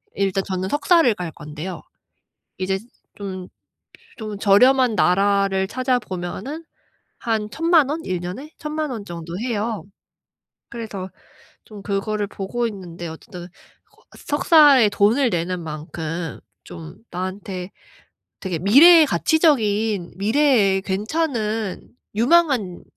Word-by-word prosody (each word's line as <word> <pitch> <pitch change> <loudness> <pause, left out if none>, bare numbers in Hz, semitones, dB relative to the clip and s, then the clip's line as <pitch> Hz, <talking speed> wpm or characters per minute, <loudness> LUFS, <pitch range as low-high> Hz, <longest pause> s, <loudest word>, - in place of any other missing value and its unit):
일단 195 0 0
저는 185 -1 -3
석사를 295 - +3
갈 175 -4 -5
건데요. 155 +3 -8 0.8
이제 190 +1 -1 0.4
좀 185 -2 -7 0.7
좀 215 -3 -6
저렴한 245 +5 +4
나라를 195 0 +2
찾아보면은 250 - -3 0.6
한 220 -3 -1
10,000,000 325 -1 +3
원? 315 +3 -3
1년에 185 - -5
10,000,000 305 -1 -3
원 225 -5 -5
정도 170 -1 -7
해요. 225 -2 -3 0.9
그래서 215 -5 -6 0.5
좀 210 -2 -12
그거를 205 +1 -2
보고 220 +5 -3
있는데 175 -5 -8
어쨌든 175 +2 -10 0.4
그 430 +1 -29 0.2
석사에 290 -6 +5
돈을 225 +6 +2
내는 175 -1 -2
만큼 160 +1 -5 0.3
좀 165 -2 -10 0.2
나한테 185 0 -5 0.7
되게 185 -4 -3
미래의 300 - +7
가치적인 220 - +1
미래에 215 -2 +3
괜찮은 215 - -2 0.3
유망한 245 - +2
205 Hz, 215 characters per minute, -21 LUFS, 185-255 Hz, 0.9 s, 미래의